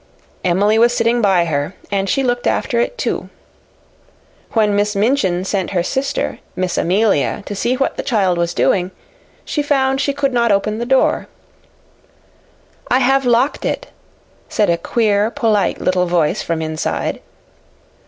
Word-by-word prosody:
Emily 200 +5 +2
was 240 +1 +4
sitting 235 0 +2
by 190 -5 +3
her, 150 +2 -2 0.2
and 195 -1 0
she 275 - +1
looked 245 -1 0
after 235 - 0
it, 370 - -1
too. - - -3 1.2
When 210 -3 +2
Miss 205 +1 0
Minchin 200 -5 +1
sent 195 -2 -1
her 175 - +2
sister, 275 - -2 0.2
Miss 185 -1 -2
Amelia, 195 0 +1
to - - -5
see 235 +5 0
what 270 - -1
the - - -1
child 195 -8 +1
was 170 0 -1
doing, 180 -1 +1 0.6
she 295 - -1
found 270 -2 +1
she 280 - +1
could 275 -1 -1
not 235 -2 +2
open 210 +2 0
the 235 - -3
door. 265 0 +2 1.6
"I 250 - +4
have 270 0 +2
locked 245 +4 +2
it," - - -3 0.6
said 210 -5 +1
a 170 - +1
queer, 210 +1 +1
polite 220 -3 0
little 180 -1 +1
voice 170 +1 +1
from 165 -1 -2
inside. 155 0 -2
210 Hz, 155 wpm, -18 LUFS, 185-245 Hz, 1.6 s, was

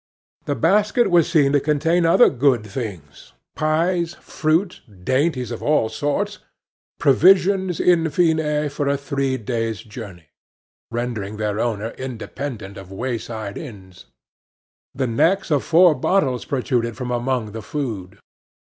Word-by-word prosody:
The 145 - -1
basket 210 - +2
was 170 -2 +4
seen 150 -5 +3
to 145 - +4
contain 165 +4 +1
other 170 +9 +6
good 125 -4 +2
things: 100 - -8 0.2
pies, 170 +2 0
fruit, 165 +4 -1 0.2
dainties 130 - 0
of 120 - -5
all 150 -7 +2
sorts 145 - -2 0.6
provisions, 185 +4 +4
in 165 -2 +3
fine, 150 -2 +1
for 145 0 -3
a 140 0 +1
three 140 -1 -2
days' 115 -2 -3
journey, 100 - -10 0.6
rendering 115 -4 -4
their 105 -1 -2
owner 110 -2 -1
independent 120 -4 -6
of 95 -1 -11
wayside 110 -2 -4
inns. 95 - -11 0.9
The 135 0 0
necks 165 +11 +1
of 145 -3 +2
four 170 0 +5
bottles 135 -4 0
protruded 120 -4 -1
from 125 0 -4
among 120 -2 -1
the 110 +1 -6
food. 105 -8 -5
135 Hz, 130 wpm, -21 LUFS, 110-160 Hz, 0.9 s, other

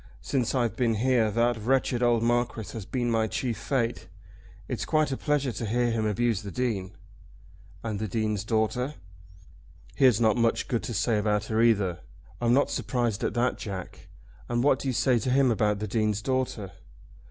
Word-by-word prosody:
Since 125 -2 -1
I've 120 -5 0
been 115 -3 +1
here 120 -1 +2
that 115 +2 +1
wretched 125 +1 +1
old 120 -2 +3
Marquis 120 -3 0
has 110 -4 -7
been 120 -2 -1
my 110 -1 +2
chief 120 +1 -2
fate. 120 -2 -1 0.6
It's - - -3
quite 155 -2 +1
a - - 0
pleasure 145 -2 0
to 115 - -4
hear 120 +2 +1
him 110 -1 0
abuse 110 0 0
the 100 - -7
Dean." 100 -3 -2 0.9
"And 110 -3 -3
the 110 - -2
Dean's 105 0 -1
daughter?" 115 +6 -1 1.0
"He 135 - +3
has 120 -5 +5
not 110 0 +3
much 115 -1 +1
good 120 - -1
to 120 - -4
say 110 +2 +1
about 105 0 0
her 110 - +3
either." 100 -7 +2 0.4
"I'm 120 -1 +2
not 140 +3 +3
surprised 120 -5 -1
at - - -1
that, 120 +1 +1
Jack. 95 -4 -7 0.4
And 120 0 0
what 135 -1 +3
do - - -4
you 130 - 0
say 125 -1 +3
to 130 - -2
him 130 0 +4
about 105 -2 +1
the 105 +1 -4
Dean's 105 0 0
daughter?" 130 -7 -2
115 Hz, 185 wpm, -27 LUFS, 110-125 Hz, 1.0 s, has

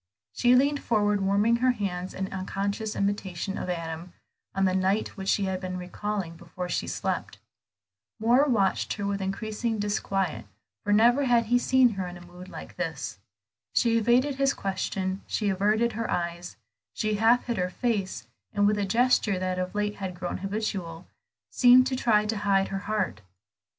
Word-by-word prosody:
She 245 0 +4
leaned 280 +2 +3
forward 210 -3 +1
warming 200 +4 +3
her 255 +2 +2
hands 185 -5 -4
in 190 +1 -4
unconscious 200 +3 -3
imitation 195 -2 -2
of - - -4
Adam, 165 0 -5 0.4
on 195 0 +2
the 185 - +2
night 190 +3 +1
which 195 -1 -5
she 205 - +2
had 190 -1 -2
been 185 -1 -4
recalling 180 -1 -4
before 180 +2 -7
she - - -1
slept. - - -3 0.8
Moor 240 +6 +4
watched 210 -9 +1
her 205 - -4
with 200 0 -1
increasing 215 +4 -2
disquiet; 195 - -1 0.4
for 205 - -1
never 240 +6 +5
had 240 -2 +3
he 245 +3 +3
seen 260 0 +4
her 195 -4 -4
in 175 0 -8
a 175 - -13
mood 180 +1 -12
like - - -10
this. 160 - -4 0.6
She 235 -2 +3
evaded 245 +5 +3
his 275 0 +2
question, 190 0 -2
she 210 -2 0
averted 210 +5 +2
her 230 +1 -3
eyes, 175 0 -3 0.4
she 215 0 0
half 230 +3 +4
hid 235 -1 -2
her 180 0 0
face, 195 - -2 0.3
and 205 - +2
with 210 0 +2
a 200 - +1
gesture 230 -2 +2
that 185 0 -2
of 185 +2 -3
late 210 0 -1
had 190 -2 -5
grown 180 0 -4
habitual, 195 -4 -4 0.5
seemed 250 0 +7
to 260 0 -1
try 215 -4 +3
to 215 +1 -1
hide 195 -1 +2
her 195 - -3
heart. 210 - -1
200 Hz, 175 wpm, -27 LUFS, 185-225 Hz, 0.8 s, seemed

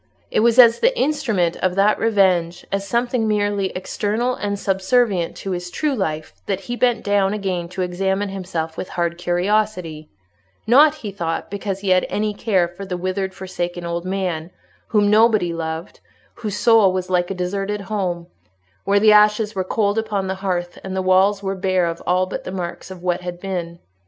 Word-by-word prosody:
It - - +2
was 235 +2 +3
as 235 -2 +7
the - - +2
instrument 230 - 0
of 185 -1 0
that 200 +2 +3
revenge, 185 -6 +2
as 195 0 -2
something 240 0 0
merely 205 -2 +1
external 215 +6 -1
and 205 -3 -3
subservient 195 -1 +1
to 195 - -5
his 180 -1 -4
true 295 - -1
life, 155 -9 -3
that 195 -1 -1
he 240 +5 -5
bent 245 -1 +1
down 205 0 +2
again 185 -4 -3
to 185 +1 -3
examine 190 +3 -1
himself 175 -4 -4
with 185 - -5
hard 170 0 -1
curiosity—not, 175 - 0
he 210 - -7
thought, 170 -3 -4
because 200 -1 -4
he 200 - -2
had 185 -1 +3
any 210 0 -1
care 195 -4 +1
for 175 +3 -9
a 180 - -2
withered, 185 +1 -3
forsaken 175 -2 -4
old 170 0 -3
man, 180 -4 -2 0.4
whom 210 -2 +2
nobody 215 -5 +4
loved, 160 +1 -5 0.3
whose 210 -3 -5
soul 225 -5 +5
was 185 0 -3
like 175 -1 +1
a 195 - -3
deserted 195 +3 -2
home, 185 -4 -3 0.6
where 200 +1 +3
the 215 +1 +6
ashes 210 0 +4
were 190 - -1
cold 205 +2 0
upon 210 -3 -2
the 190 - -2
hearth, 175 -2 -2
and 190 0 -5
the 190 - -1
walls 190 +2 +3
were 195 0 -1
bare 185 -1 +1
of 170 0 -3
all 185 +1 +3
but 185 - -6
the - - -6
marks 180 -2 -5
of 185 -2 -10
what 180 0 0
had 175 -1 -6
been. 175 -3 -4
190 Hz, 185 wpm, -21 LUFS, 175-210 Hz, 0.6 s, as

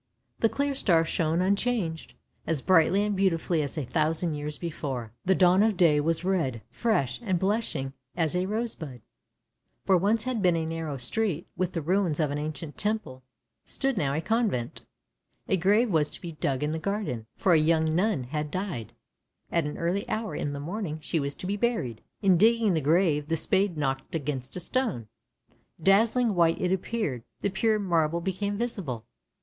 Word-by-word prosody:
The 225 - +3
clear 280 +3 -1
star 170 -11 +3
shone 165 +2 +1
unchanged, 195 -4 -1 0.3
as 160 -5 -1
brightly 185 +2 +4
and 210 -1 0
beautifully 175 -3 +1
as 145 +1 -4
a 150 - -2
thousand 160 +4 0
years 150 0 -4
before; 135 -9 -4
the 190 - +4
dawn 185 +1 +5
of 215 -3 +2
day 160 -4 +5
was 165 +2 0
red, 160 - 0
fresh, 220 - 0
and 190 -5 +1
blushing 190 -9 -1 0.2
as 165 -1 0
a 180 +1 0
rose 225 +3 -1
bud. 135 -8 -9 0.8
Where 190 -2 +4
once 210 +4 +2
had 250 -3 -2
been 180 -3 +4
a 165 -1 -1
narrow 160 -3 -4
street, 175 - 0
with 185 0 -1
the 165 - -2
ruins 175 -2 +1
of 150 -3 +1
an 145 - -2
ancient 150 0 -6
temple, 210 -11 -1 0.4
stood 270 -1 0
now 140 -7 0
a 155 - 0
convent. 215 - -1 0.7
A - - +2
grave 205 +6 +3
was 155 -3 +2
to - - -7
be 170 - -6
dug 140 -3 -1
in 150 - 0
the 160 - -2
garden, 175 - -3
for 185 - +3
a 160 - +6
young 160 0 +2
nun 190 - +1
had 150 +4 -3
died, 145 - -4 0.6
and 170 -3 +1
at - - -2
an - - -8
early 180 +4 -1
hour 220 0 -2
in 145 - -2
the 140 - -5
morning 170 +1 -4
she 160 +2 -1
was 140 0 -3
to - - -8
be 200 +2 -1
buried. 195 - -1 0.2
In 190 -3 +5
digging 225 0 +4
the 160 - +1
grave 155 -1 +2
the 165 +1 0
spade 190 +2 +1
knocked 135 0 -2
against 135 -4 -3
a - - -3
stone. 190 - -1 0.7
Dazzling 220 +6 +3
white 170 -2 +3
it 180 - 0
appeared 190 - -2
— - - -47
the 200 - 0
pure 215 +3 +2
marble 170 -5 +1
became 195 +3 -2
visible. 195 - -3
170 Hz, 190 wpm, -27 LUFS, 150-200 Hz, 0.8 s, a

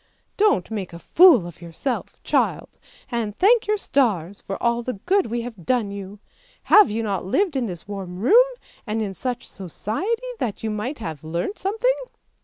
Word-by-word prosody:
Don't 405 - +2
make 195 -5 -4
a - - -7 0.2
fool 335 - +8
of 175 -1 -10
yourself, 170 - -5
child, - - 0 0.3
and 225 -3 -2
thank 435 +3 +4
your 425 0 +2
stars 205 - 0
for 195 - -5
all 235 0 +1
the 250 +1 -3
good 390 +1 +3
we 235 +1 -2
have 230 -6 -8
done 230 -1 0
you! 200 0 -7 0.5
Have 420 -2 +7
you 225 +2 -2
not 200 -3 -2
lived 340 - +1
in 255 -3 0
this 175 -1 -7
warm 190 -3 -6
room, 435 - +6 0.4
and 215 +1 -1
in 200 -2 -4
such 245 +4 -4
society 230 - -3
that 225 -3 -3
you 220 - -1
might 225 +8 -3
have 160 -9 -6
learnt 170 - -3
something? 450 +6 +1
225 Hz, 180 wpm, -23 LUFS, 195-315 Hz, 0.5 s, fool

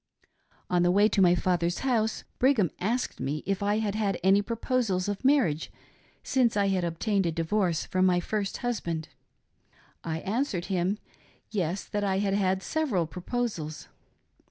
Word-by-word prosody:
'' - - -37
On 180 -1 +3
the 175 - +3
way 200 +4 +5
to 205 - +1
my 180 -1 +6
father's 175 -1 0
house 225 -4 +1 0.2
Brigham 245 - +3
asked 235 +7 -1
me 150 +2 -3
if 195 -1 -1
I 205 +1 +1
had 215 -2 -1
had 205 -3 -1
any 195 +2 +5
proposals 230 -3 -1
o| 205 - 0
marriage 260 - +2 0.5
since 245 -5 +2
I 200 -1 +3
had 190 -2 +1
obtained 190 +3 0
a - - 0
divorce 170 +1 0
from 185 0 +2
my 180 -1 +3
first 200 +2 -2
husband. 170 -10 -2 0.9
I 160 -1 -3
answered 205 -4 -1
him, 185 +3 +1 0.3
" - - -33
Yes, 190 -2 -1
that 205 0 -3
I 190 -1 +1
had 195 0 0
had 190 -1 +1
several 270 - 0
proposals." 180 -3 -4
195 Hz, 165 wpm, -28 LUFS, 175-215 Hz, 0.9 s, my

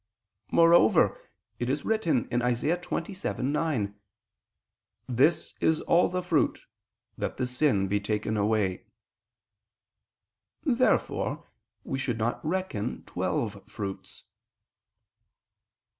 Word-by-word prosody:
Moreover 165 -8 +4 0.3
it 120 - -1
is 140 +2 -1
written 170 - +1
(Isa. 120 +6 +1
27:9): 150 - -2 1.1
"This 130 +7 +2
is 160 -1 +2
all 170 +1 +3
the 180 0 -2
fruit... 170 -4 +1 0.6
that - - -3
the 125 - 0
sin... 125 -6 +1
be 100 +2 +1
taken 105 +1 -2
away." 105 -3 0 1.8
Therefore - - +1 0.4
we 135 - -3
should 120 -4 -1
not 115 +2 -1
reckon 170 - -2
twelve - - -2
fruits. 100 -2 -7
125 Hz, 90 wpm, -28 LUFS, 110-165 Hz, 1.8 s, Moreover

